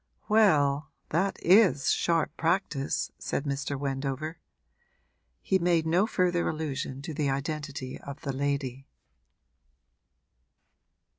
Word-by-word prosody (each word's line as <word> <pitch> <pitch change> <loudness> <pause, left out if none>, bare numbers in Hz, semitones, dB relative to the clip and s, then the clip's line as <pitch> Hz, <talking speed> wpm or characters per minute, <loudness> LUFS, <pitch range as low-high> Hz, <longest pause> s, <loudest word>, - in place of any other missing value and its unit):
'Well, 150 -10 +3 0.2
that 190 +5 0
is 185 -6 +5
sharp 165 -2 +1
practice!' 160 -5 0
said - - -2
Mr. 140 -1 -3
Wendover. 140 +3 -3 1.0
He 190 - +2
made 170 -2 +2
no 175 +6 +3
further 180 -5 +1
allusion 140 -3 -4
to 160 0 -5
the 145 -1 0
identity 140 -1 -4
of 140 +1 -9
the 140 -3 -3
lady. 135 -1 -2
150 Hz, 100 wpm, -28 LUFS, 140-170 Hz, 1.0 s, is